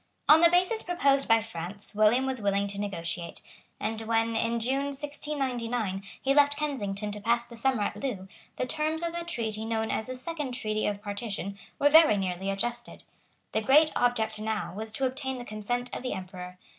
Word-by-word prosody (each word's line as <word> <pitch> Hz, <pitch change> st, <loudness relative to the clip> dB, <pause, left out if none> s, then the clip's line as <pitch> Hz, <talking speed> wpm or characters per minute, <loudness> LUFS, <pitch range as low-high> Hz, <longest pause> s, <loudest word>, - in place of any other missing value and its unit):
On 310 Hz, +2 st, +8 dB
the 340 Hz, -, +8 dB
basis 365 Hz, +6 st, +3 dB
proposed 280 Hz, -6 st, +2 dB
by 225 Hz, -1 st, +5 dB
France 200 Hz, 0 st, -5 dB
William 215 Hz, +5 st, +4 dB
was 260 Hz, -3 st, -2 dB
willing 200 Hz, 0 st, +1 dB
to 200 Hz, 0 st, -4 dB
negotiate; 170 Hz, -3 st, -4 dB, 0.4 s
and, 220 Hz, +1 st, -2 dB
when, 225 Hz, 0 st, +1 dB
in 230 Hz, +1 st, +1 dB
June 265 Hz, +4 st, +1 dB
1699, 260 Hz, -8 st, -2 dB, 0.2 s
he 275 Hz, -, +2 dB
left 285 Hz, 0 st, +4 dB
Kensington 210 Hz, -9 st, -2 dB
to 210 Hz, 0 st, -6 dB
pass 235 Hz, +2 st, +1 dB
the 235 Hz, -, -12 dB
summer 235 Hz, -2 st, +1 dB
at -, -, -2 dB
Loo, 210 Hz, -9 st, -4 dB, 0.3 s
the -, -, 0 dB
terms 310 Hz, +4 st, -1 dB
of 335 Hz, 0 st, -2 dB
the 340 Hz, 0 st, -3 dB
treaty 220 Hz, -10 st, -3 dB
known 220 Hz, 0 st, -1 dB
as 220 Hz, -, -2 dB
the 255 Hz, -, -5 dB
Second 290 Hz, 0 st, -4 dB
Treaty 215 Hz, -3 st, -1 dB
of 205 Hz, 0 st, -3 dB
Partition 205 Hz, -1 st, -4 dB, 0.2 s
were 290 Hz, -, +4 dB
very 315 Hz, -9 st, +7 dB
nearly 190 Hz, 0 st, -2 dB
adjusted. 240 Hz, +5 st, -3 dB, 0.5 s
The 220 Hz, -, +1 dB
great 300 Hz, +7 st, +5 dB
object 220 Hz, -3 st, +1 dB
now 215 Hz, -3 st, -2 dB
was 220 Hz, +3 st, -4 dB
to 270 Hz, -, 0 dB
obtain 265 Hz, 0 st, -1 dB
the 245 Hz, -, -7 dB
consent 245 Hz, +4 st, -3 dB
of -, -, -4 dB
the 255 Hz, -, -2 dB
Emperor. 180 Hz, -1 st, -7 dB
230 Hz, 190 wpm, -28 LUFS, 210-270 Hz, 0.5 s, On